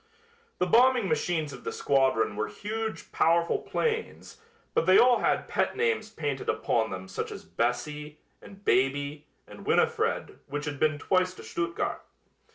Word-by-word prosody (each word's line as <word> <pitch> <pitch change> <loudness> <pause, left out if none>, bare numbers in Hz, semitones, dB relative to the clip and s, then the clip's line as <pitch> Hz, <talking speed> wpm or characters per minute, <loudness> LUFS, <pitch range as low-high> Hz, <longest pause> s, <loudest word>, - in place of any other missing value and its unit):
The 180 - +1
bombing 245 +3 +4
machines 155 -2 -1
of 125 - -10
the - - -3
squadron 130 -6 +2
were 105 +1 -1
huge, 220 +1 -5
powerful 170 +1 +2
planes, 450 -1 -3 0.3
but 165 - +1
they 185 - +7
all 245 -1 +6
had - - +1
pet - - 0
names 455 - 0
painted 145 -9 -3
upon 110 -1 +1
them 95 0 -6
such 95 - -4
as - - -8
"Bessie" 150 +5 -2 0.2
and 200 0 -14
"Baby" 140 +4 +1 0.2
and - - -12
"Winifred" - - +1
which 145 +2 -4
had 145 -2 -4
been 155 -1 +2
twice 185 +4 +1
to - - -11
Stuttgart. 170 0 -2
155 Hz, 155 wpm, -28 LUFS, 135-195 Hz, 0.3 s, they